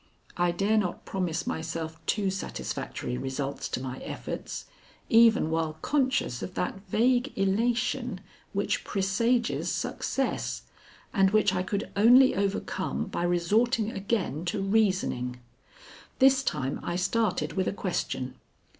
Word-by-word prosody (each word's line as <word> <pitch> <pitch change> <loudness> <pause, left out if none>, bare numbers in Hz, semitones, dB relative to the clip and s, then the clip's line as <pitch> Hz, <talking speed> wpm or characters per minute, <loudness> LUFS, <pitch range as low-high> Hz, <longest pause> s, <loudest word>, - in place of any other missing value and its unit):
I 175 0 +2
dare 200 +5 +2
not 180 -4 -3
promise 180 -4 -2
myself 160 0 -4
too 200 -3 +1
satisfactory 125 -8 -4
results 135 +1 -3
to - - -2
my 130 0 -5
efforts, - - -6 0.4
even 225 -8 +5
while 160 -1 -1
conscious 265 - +1
of 185 - -6
that 180 +2 -2
vague 245 +6 +2
elation 230 +3 0 0.3
which 200 0 -1
presages 230 +5 +1
success, 270 -1 -2 0.5
and 195 -3 +4
which 210 -1 +3
I 180 - +1
could 200 +3 -3
only 245 +6 +7
overcome 195 - -2
by - - -3
resorting 210 +7 +2
again 195 - -2
to 175 - -1
reasoning. 190 - +1 0.8
This 265 0 +5
time 135 - -2
I 175 - -3
started 215 +5 0
with 190 -1 0
a - - +1
question. 175 -9 -3
195 Hz, 125 wpm, -28 LUFS, 165-225 Hz, 0.8 s, only